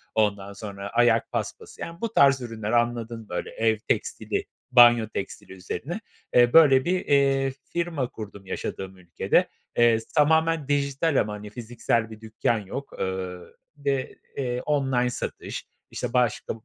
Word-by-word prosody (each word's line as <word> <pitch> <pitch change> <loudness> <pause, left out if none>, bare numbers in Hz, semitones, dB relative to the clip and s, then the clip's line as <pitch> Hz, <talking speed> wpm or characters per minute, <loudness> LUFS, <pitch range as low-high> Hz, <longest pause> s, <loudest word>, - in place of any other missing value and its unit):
ondan 100 -2 0
sonra 100 -1 -7
ayak 115 -1 +3
paspası, - - -5
yani, 170 +3 -7
bu 230 -1 -2
tarz 135 -5 +5
ürünler, 115 -3 -4
anladın 120 -1 0
mı, 110 - -14
böyle 90 - -3
ev 110 -1 +1
tekstili, - - -1 0.3
banyo 120 -2 +7
tekstili 100 -2 -6
üzerine. 135 - -5 0.4
Eee, 120 0 +6
böyle 140 -5 +7
bir, 180 +1 0
eee, 135 -1 +3 0.2
firma 165 -7 -1
kurdum 100 -3 -9
yaşadığım 95 0 -5
ülkede. 90 -2 +1 0.3
Eee, 120 -1 +5 0.2
tamamen 160 0 +3
dijital 140 +1 +1
ama, 105 0 -3
hani, 105 0 -8
fiziksel 115 0 -2
bir 110 0 -11
dükkân 110 +1 0
yok. 120 +8 -7
Eee, 95 -1 -3 0.4
bir 145 - -20
de, 135 -1 -3 0.2
eee, 125 -2 -2
online 130 -4 +1
satış, - - -5 0.3
işte 125 -1 -4
başka 125 -3 +1
120 Hz, 150 wpm, -25 LUFS, 105-140 Hz, 0.4 s, banyo